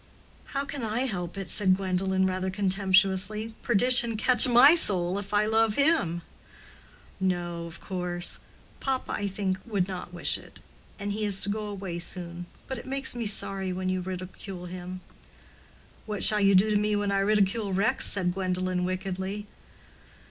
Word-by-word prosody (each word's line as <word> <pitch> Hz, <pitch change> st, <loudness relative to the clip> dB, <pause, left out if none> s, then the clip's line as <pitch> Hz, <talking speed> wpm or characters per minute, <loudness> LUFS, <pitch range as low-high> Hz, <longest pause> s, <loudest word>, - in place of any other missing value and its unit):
"How 275 Hz, 0 st, -3 dB
can 280 Hz, -1 st, -6 dB
I 225 Hz, +1 st, -1 dB
help 180 Hz, -9 st, -3 dB
it?" 195 Hz, -2 st, -5 dB
said 185 Hz, +2 st, +2 dB
Gwendolen, 190 Hz, 0 st, 0 dB
rather 185 Hz, 0 st, -2 dB
contemptuously. 195 Hz, +2 st, +1 dB
"Perdition 240 Hz, 0 st, +3 dB
catch 250 Hz, +3 st, +7 dB
my 250 Hz, +5 st, +7 dB
soul 190 Hz, -, +3 dB
if 200 Hz, 0 st, -9 dB
I 210 Hz, 0 st, +2 dB
love 220 Hz, 0 st, +2 dB
him." 280 Hz, -, +2 dB, 1.0 s
"No, 175 Hz, -2 st, -2 dB
of 165 Hz, +2 st, -11 dB
course; 180 Hz, -2 st, -3 dB, 0.4 s
papa, 265 Hz, -1 st, -2 dB
I 205 Hz, -, -2 dB
think, 190 Hz, -1 st, -2 dB
would 200 Hz, -6 st, -1 dB
not 180 Hz, -2 st, -7 dB
wish 175 Hz, -, 0 dB
it. -, -, -15 dB, 0.4 s
And 205 Hz, 0 st, -4 dB
he 215 Hz, +1 st, -3 dB
is 200 Hz, -2 st, 0 dB
to 205 Hz, -, +1 dB
go 210 Hz, +1 st, -3 dB
away 195 Hz, -4 st, -6 dB
soon. 175 Hz, 0 st, -2 dB, 0.2 s
But 265 Hz, -2 st, -5 dB
it -, -, -12 dB
makes 270 Hz, -1 st, 0 dB
me 235 Hz, -2 st, -1 dB
sorry 195 Hz, -2 st, -1 dB
when 185 Hz, 0 st, -3 dB
you 185 Hz, 0 st, -1 dB
ridicule 185 Hz, 0 st, -7 dB
him." 180 Hz, +1 st, -8 dB, 1.1 s
"What 210 Hz, -2 st, -4 dB
shall 210 Hz, -1 st, +5 dB
you 195 Hz, -1 st, +4 dB
do 205 Hz, +4 st, +4 dB
to 210 Hz, -, +3 dB
me 210 Hz, 0 st, 0 dB
when 205 Hz, -1 st, -1 dB
I 195 Hz, -, +1 dB
ridicule 205 Hz, +1 st, +1 dB
Rex?" 195 Hz, +3 st, +2 dB
said 180 Hz, -3 st, +1 dB
Gwendolen, 185 Hz, -1 st, -2 dB
wickedly. 190 Hz, +2 st, -4 dB
195 Hz, 165 wpm, -27 LUFS, 185-215 Hz, 1.1 s, catch